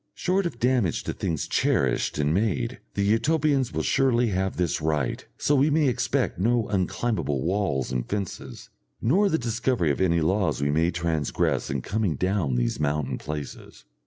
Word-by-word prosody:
Short 190 0 +1
of 165 - -8
damage 120 -7 +1
to - - -3
things 80 -4 -2
cherished - - +1
and 75 +1 +1
made, 115 +5 -1 0.2
the 100 - +1
Utopians 135 +4 +2
will - - -2
surely 125 -3 +2
have 95 0 -1
this 85 -3 0
right, 75 -4 -1
so 145 - +1
we 145 +2 +4
may 150 -1 +3
expect 125 -7 0
no 115 +2 +2
unclimbable 90 - -1
walls 85 -8 -1
and 60 -1 -3
fences, 100 -3 -5 0.3
nor 190 - +3
the 160 - +2
discovery 115 - 0
of 70 - -2
any 85 -2 +3
laws 95 +3 +1
we 70 +1 +1
may 80 +3 +2
transgress 85 -4 -1
in 65 -2 -2
coming 100 -6 -1
down 95 -5 0
these - - 0
mountain 70 -3 -1
places. 75 -1 -7
95 Hz, 165 wpm, -25 LUFS, 75-120 Hz, 0.3 s, we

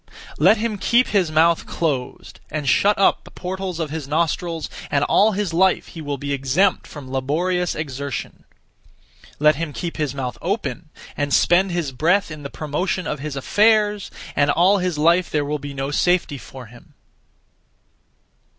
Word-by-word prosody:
Let 190 +9 +5
him 215 -2 -2
keep 240 +5 +3
his 185 -6 +1
mouth 165 +2 +3
closed, 140 -7 -3
and 150 -3 -4
shut 205 +10 +3
up 195 - +3
the - - -14
portals 185 -1 -5
(of 155 -3 -3
his 155 -3 -5
nostrils), 165 +2 -1 0.2
and 140 0 +1
all 210 +7 +3
his 195 -3 -2
life 185 +2 +2
he 165 - -9
will 145 -2 -3
be 140 +1 -3
exempt 140 +8 +1
from 140 -4 -10
laborious 170 +7 -1
exertion. 140 -2 -5 0.9
Let 150 -1 +4
him 160 -2 -4
keep 170 +2 -5
his 150 -4 -2
mouth 130 -3 -4
open, 180 -3 -3 0.3
and 145 0 -2
(spend 185 +6 +4
his 170 -5 -2
breath) 170 +8 +1
in 155 -1 -8
the 140 - -6
promotion 170 +5 -3
of 150 - -3
his 145 0 -5
affairs, 210 +6 +2 0.3
and 145 - +3
all 185 +7 +4
his 180 -3 -1
life 170 +4 +3
there 150 -2 0
will 150 +1 -2
be 145 0 -7
no 135 +1 -3
safety 175 -3 +1
for 130 0 -11
him. 120 +2 -17
160 Hz, 170 wpm, -21 LUFS, 145-185 Hz, 0.9 s, Let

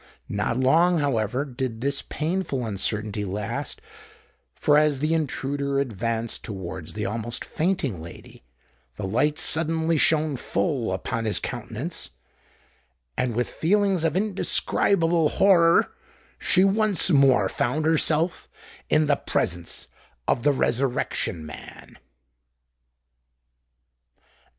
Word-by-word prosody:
Not 105 +4 -1
long, 165 +7 +4
however, 130 -2 0
did 130 -4 -4
this 140 +1 0
painful 155 -6 -2
uncertainty 105 0 -2
last; 105 - -4 0.8
for 145 - +2
as 150 -2 +2
the 155 +4 0
intruder 140 -2 -1
advanced 115 -2 -2
towards 95 -5 -7
the 105 -1 -3
almost 115 +3 -3
fainting 155 - -1
lady, 85 +1 -12 0.5
the - - -5
light 145 +10 +1
suddenly 160 0 +1
shone 155 -2 +2
full 130 - -1
upon 115 +5 -3
his 105 - +1
countenance;—and, 65 - -7
with 120 +1 0
feelings 195 0 +1
of 165 +1 +1
indescribable 175 -4 +2
horror, 170 -4 +4 0.5
she 185 - +3
once 200 -1 +3
more 135 - +5
found 145 +10 -1
herself 160 +1 +1 0.4
in 155 0 +3
the 145 -1 +2
presence 85 -3 -2 0.4
of 120 - +1
the 145 - +3
Resurrection 125 - -1
Man. 75 - -12
135 Hz, 105 wpm, -24 LUFS, 110-160 Hz, 0.8 s, more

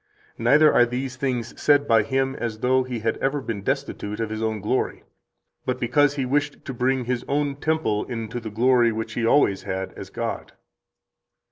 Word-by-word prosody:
Neither 150 +2 +5
are 120 - +5
these 130 +2 -4
things 125 -3 -3
said 145 -1 +4
by 115 -1 +5
Him 135 +4 -1
as 115 -2 -3
though 130 +1 +3
He 125 -3 -4
had 115 0 0
ever 140 +2 0
been 115 -6 -4
destitute 130 -4 -3
of 110 -1 -2
His 110 0 -4
own 110 -1 -1
glory, 105 +6 -1 0.6
but 125 0 -2
because 140 +4 +2
He 135 -2 -1
wished 145 +2 -1
to 135 - -5
bring 125 +1 0
His 125 0 -2
own 140 -1 0
temple 150 -9 0
into 115 -1 -5
the 115 -2 -6
glory 120 +2 +3
which 110 0 -4
He 115 0 0
always 105 -8 +3
has 95 0 -4
as - - -9
God." - - -4
125 Hz, 190 wpm, -24 LUFS, 115-135 Hz, 0.6 s, Neither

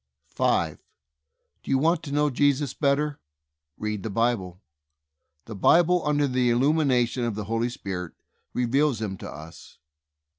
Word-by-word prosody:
5. - - 0 0.8
Do - - -12
you 135 - +3
want 165 +4 +2
to 150 - -8
know 150 0 +2
Jesus 140 0 +1
better? 145 0 0 0.6
Read 105 -1 -3
the 110 - -4
Bible. 100 -5 -1 0.9
The 115 - -8
Bible, 175 - +4
under 145 -1 +1
the 125 -1 +1
il 120 - +2
lumination 130 -4 +2
of 115 - -3
the 105 - -4
Holy 115 +3 -1
Spirit, 95 -7 -6 0.4
reveals 130 +1 +1
Him 105 -3 -3
to - - -7
us. 80 +3 -12
125 Hz, 145 wpm, -25 LUFS, 110-145 Hz, 0.9 s, Bible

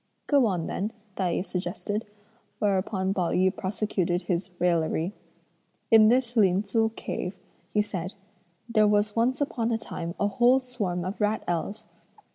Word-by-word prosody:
"Go 280 -5 +4
on 180 -5 -1
then," 210 +4 -3 0.2
Tai 185 -3 0
yü 185 - -1
suggested, 200 +4 -3 0.5
whereupon 195 -1 0
Pao 180 -4 0
yü 185 +1 +2
prosecuted 185 -2 -1
his 175 +2 -1
raillery. 170 +1 +1 0.8
"In 220 -1 +8
this 245 +1 +2
Lin 195 -3 +4
Tzu 220 +2 +1
cave," 180 +2 -4 0.3
he 210 - +2
said, 185 -3 -5 0.5
"there 215 -3 +4
was 210 0 +2
once 250 +5 +1
upon 235 -5 0
a 225 - +2
time 170 -6 -5
a - - +2
whole 240 +6 +4
swarm 205 -9 -3
of 190 +4 -4
rat 210 +1 +1
elves. 175 +5 -3
205 Hz, 150 wpm, -27 LUFS, 180-225 Hz, 0.8 s, In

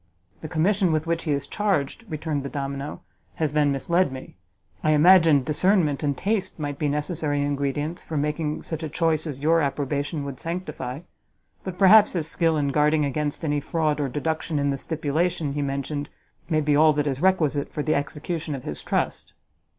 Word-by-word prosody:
"The 155 - -5
commission 180 +3 +2
with 155 0 0
which 165 0 -1
he 155 - 0
is 140 -1 -1
charged," 195 +1 -1
returned 155 -2 -2
the 140 - -5
domino, 140 +1 -5 0.3
"has 155 -3 -1
then 150 -1 +3
misled 170 +4 +1
me; 130 0 -9 0.5
I 155 - +3
imagined 160 -3 +6
discernment 155 -1 +2
and 145 -2 -1
taste 200 -2 -1
might 145 -3 -4
be 150 - +1
necessary 150 -1 -1
ingredients 145 +3 -2
for 160 - -4
making 150 +1 -2
such 160 -1 -5
a 160 - -4
choice 160 0 0
as 140 -3 -5
your 165 +2 +4
approbation 145 +1 -2
would 135 -2 -6
sanctify: 165 -6 -5 0.6
but 185 -2 -6
perhaps 205 +2 +7
his 165 -4 -1
skill 165 -1 +1
in 145 -1 +1
guarding 150 +1 +2
against 150 +3 -2
any 145 -1 +1
fraud 155 0 -1
or 140 -2 -1
deduction 160 +2 -2
in 140 0 +1
the 140 - -2
stipulation 160 +1 -1
he 145 - -2
mentioned, 140 +1 -3 0.4
may 155 -2 +2
be 150 -1 +2
all 155 +1 +6
that 145 0 0
is 135 -1 -2
requisite 155 -6 +1
for 150 - -3
the 155 - +1
execution 150 +2 -3
of 130 - -7
his 75 - -5
trust." - - -2
150 Hz, 185 wpm, -24 LUFS, 145-165 Hz, 0.6 s, perhaps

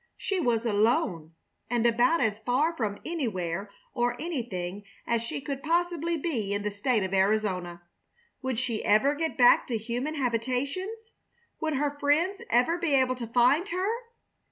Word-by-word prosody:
She 390 -2 -1
was 240 -7 +1
alone, 205 -7 +1 0.3
and 240 -1 +1
about 240 +8 +3
as 215 -3 +1
far 265 +9 +1
from 210 -7 -2
anywhere 200 - -2 0.2
or 245 -1 0
anything 205 - -4 0.2
as 235 -1 +1
she 235 - -4
could 275 -1 -4
possibly 340 +1 0
be 235 - -2
in 205 - -2
the 210 - -1
State 210 +2 0
of 190 0 -3
Arizona. 190 -3 0 0.6
Would 260 -3 -2
she 235 -3 -2
ever 245 +7 +4
get 320 +1 -3
back 245 -2 +6
to 235 - -1
human 245 +7 -3
habitations? 280 - -2 0.5
Would 315 -2 -1
her 290 +1 -1
friends 330 +8 +1
ever 255 +9 +3
be 330 -5 +1
able 260 -1 +3
to 245 -2 -6
find 250 - +3
her? 370 0 -1
245 Hz, 155 wpm, -28 LUFS, 215-305 Hz, 0.6 s, back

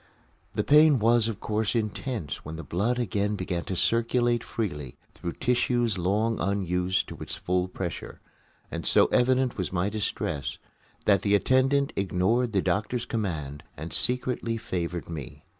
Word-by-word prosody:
The - - 0
pain 150 -1 +6
was 115 0 +4
of 110 -3 -4
course 110 +1 -1
intense 110 - -3
when 80 +2 -6
the 80 - -6
blood 105 +11 0
again 105 -3 0
began 90 -3 -3
to 95 - -3
circulate 120 +3 +1
freely 75 - -4 0.2
through 85 - -5
tissues 120 -4 +1
long 105 +5 +1
unused 95 -2 0
to - - -8
its - - -6
full 90 0 0
pressure, 90 -1 -6 0.5
and - - -4
so - - +5
evident 130 -1 +2
was 90 - -2
my 90 +2 0
distress 105 -9 -2 0.5
that 100 -3 +4
the 100 0 +3
attendant 135 +5 +3
ignored 100 +6 +1
the 95 -3 +1
doctor's 105 +6 0
command 80 - -3 0.2
and 80 +3 -6
secretly 125 -2 +1
favored 90 -5 -3
me. 80 -6 -8
105 Hz, 150 wpm, -27 LUFS, 90-120 Hz, 0.5 s, pain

